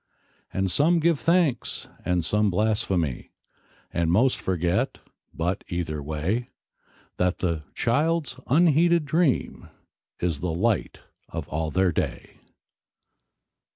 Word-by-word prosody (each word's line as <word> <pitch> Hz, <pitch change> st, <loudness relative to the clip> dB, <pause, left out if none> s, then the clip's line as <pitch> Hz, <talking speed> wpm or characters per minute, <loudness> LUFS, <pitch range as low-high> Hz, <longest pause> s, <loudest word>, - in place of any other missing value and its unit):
And 95 Hz, -, -1 dB, 0.4 s
give 165 Hz, -2 st, +2 dB
some -, -, -17 dB
thanks, 165 Hz, -8 st, +1 dB, 0.2 s
and 90 Hz, -2 st, 0 dB
some 105 Hz, +3 st, +2 dB
blaspheme, 95 Hz, -, 0 dB, 0.7 s
And 85 Hz, -1 st, +1 dB
most 125 Hz, +8 st, +3 dB
forget, 90 Hz, +7 st, 0 dB, 0.3 s
but, 90 Hz, +5 st, -2 dB
either 85 Hz, -4 st, -3 dB
way, 80 Hz, -, -2 dB, 0.7 s
That 90 Hz, +1 st, 0 dB
and 85 Hz, -3 st, +1 dB
the -, -, -15 dB
child's 145 Hz, +1 st, 0 dB
unheeded 170 Hz, +2 st, +4 dB
dream 155 Hz, -3 st, 0 dB, 0.5 s
Is 85 Hz, -5 st, -1 dB
all 80 Hz, 0 st, -2 dB
the -, -, -4 dB
light 115 Hz, 0 st, 0 dB, 0.3 s
of -, -, -5 dB
all 80 Hz, 0 st, -2 dB
their 95 Hz, +2 st, +2 dB
day. -, -, -4 dB
95 Hz, 120 wpm, -25 LUFS, 85-135 Hz, 0.7 s, unheeded